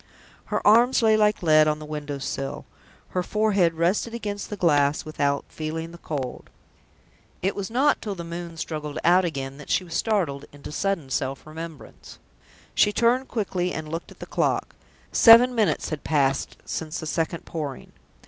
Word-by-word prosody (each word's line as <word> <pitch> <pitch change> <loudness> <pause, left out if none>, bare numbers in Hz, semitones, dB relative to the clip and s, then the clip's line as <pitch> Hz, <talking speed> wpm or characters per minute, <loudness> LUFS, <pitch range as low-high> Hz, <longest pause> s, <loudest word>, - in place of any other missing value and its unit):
Her - - -2
arms 235 +4 +5
lay 220 -1 +5
like 210 -3 +2
lead 155 -2 +5
on 150 0 +1
the 155 - -9
window 150 -1 -5
sill; 135 0 -4 0.4
her 180 - -1
forehead 200 -4 +2
rested 185 +8 0
against 205 -3 -4
the 210 - -5
glass 145 -5 +2
without 140 -2 -1
feeling 160 +1 -5
the 170 - -12
cold. 135 -7 -5 0.9
It 195 - 0
was 195 -2 -4
not 265 +6 +2
till 205 -2 -4
the 170 - -6
moon 170 0 -7
struggled 155 -2 -4
out 180 +2 +5
again 135 -4 -4
that 150 - -11
she - - +2
was 170 -2 -10
startled 165 -9 0
into 145 0 -10
sudden 170 -6 -2
self 135 0 -2
remembrance. 160 0 -10 0.6
She 210 - +4
turned 240 +4 +2
quickly, 185 -5 -2
and 155 -1 -5
looked 165 +1 -5
at - - -15
the - - -8
clock; - - -1 0.4
seven 240 +2 +8
minutes 220 -4 +1
had 155 -2 -5
passed 140 -3 0
since 160 0 -4
the - - -6
second 165 +1 -2
Pouring. 150 -5 -6
165 Hz, 170 wpm, -25 LUFS, 150-205 Hz, 0.9 s, seven